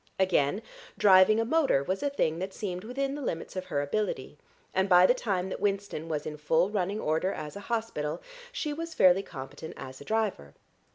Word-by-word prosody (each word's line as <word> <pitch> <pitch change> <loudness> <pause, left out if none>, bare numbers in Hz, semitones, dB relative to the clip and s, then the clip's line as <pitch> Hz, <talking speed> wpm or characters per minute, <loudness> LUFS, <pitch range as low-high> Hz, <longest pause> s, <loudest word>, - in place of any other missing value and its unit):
Again, 190 +1 +2 0.3
driving 205 +1 +6
a 225 - +1
motor 275 - +2
was 185 +6 -2
a 285 - +1
thing 165 - 0
that 190 +1 -5
seemed 185 -3 -4
within 270 +4 -2
the 290 - -5
limits 165 -10 -4
of 185 0 -3
her 145 -4 -1
ability, 210 +9 -2 0.4
and 190 +1 +1
by 180 0 +7
the 245 - +5
time 195 -7 -2
that - - -5
Winston 200 -5 -2
was 150 -2 -2
in 150 - -5
full 160 +5 +2
running 200 0 -1
order 160 +3 0
as 150 -4 -6
a - - -6
hospital 220 -11 -2 0.3
she 310 -12 -3
was 330 +2 -6
fairly 185 +1 +6
competent 145 -1 -9
as 130 0 -9
a - - -7
driver. 210 - -2
190 Hz, 195 wpm, -29 LUFS, 160-220 Hz, 0.4 s, by